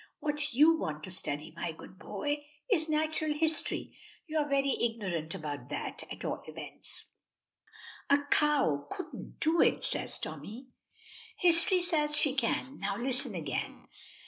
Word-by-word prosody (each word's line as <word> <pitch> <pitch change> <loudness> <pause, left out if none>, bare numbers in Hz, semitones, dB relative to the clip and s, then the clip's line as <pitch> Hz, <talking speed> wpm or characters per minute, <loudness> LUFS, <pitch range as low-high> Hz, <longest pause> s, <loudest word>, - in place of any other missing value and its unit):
What 295 -3 -2
you 320 +4 +6
want 155 0 -3
to 185 - -5
study, 155 -2 -3
my 170 -1 -3
good 185 +3 -13
boy, 290 +8 -3 0.3
is 320 -5 +3
natural 310 0 +1
history. 315 +1 0 0.3
You 315 -2 -1
are 295 -1 0
very 275 -1 +2
ignorant 190 -9 -1
about 145 -2 -5
that, - - -4
at - - -6
all - - -2
events." - - -7 1.0
"A 285 +1 +5
cow 165 - +3
couldn't 370 - -7
do 325 +2 +3
it," - - +3
says - - +2
Tommy. 250 +5 -7 0.7
"History 355 +1 +6
says 300 -4 +2
she 285 -3 +3
can. 265 +1 -1
Now, 200 0 -1
listen 255 -1 0
again. 150 -6 -4
275 Hz, 145 wpm, -31 LUFS, 185-310 Hz, 1.0 s, you